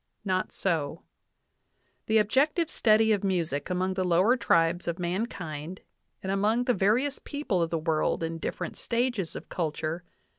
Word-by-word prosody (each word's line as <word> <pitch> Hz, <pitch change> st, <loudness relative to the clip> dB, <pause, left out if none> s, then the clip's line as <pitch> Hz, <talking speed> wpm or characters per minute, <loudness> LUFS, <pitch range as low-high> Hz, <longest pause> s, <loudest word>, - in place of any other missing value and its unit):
Not 185 Hz, -1 st, 0 dB
so. 165 Hz, -4 st, -1 dB, 1.0 s
"The 220 Hz, 0 st, +4 dB
ob 210 Hz, -, +2 dB
jective 300 Hz, -, +2 dB
study 220 Hz, 0 st, +4 dB
of 205 Hz, -2 st, +1 dB
music 170 Hz, -6 st, -1 dB
among 185 Hz, +1 st, 0 dB
the 185 Hz, 0 st, -1 dB
lower 185 Hz, +7 st, +4 dB
tribes 170 Hz, -7 st, +2 dB
of 170 Hz, 0 st, -1 dB
mankind, 175 Hz, -3 st, -4 dB, 0.4 s
and 190 Hz, -, -2 dB
among 210 Hz, +5 st, +2 dB
the 245 Hz, 0 st, +2 dB
various 235 Hz, +9 st, +1 dB
people 285 Hz, -, -1 dB
of 165 Hz, -, +1 dB
the 165 Hz, -, 0 dB
world 160 Hz, 0 st, 0 dB
in 165 Hz, 0 st, -3 dB
different -, -, -4 dB
stages 235 Hz, -7 st, -1 dB
of -, -, -7 dB
culture 160 Hz, 0 st, -3 dB
185 Hz, 155 wpm, -28 LUFS, 165-220 Hz, 1.0 s, The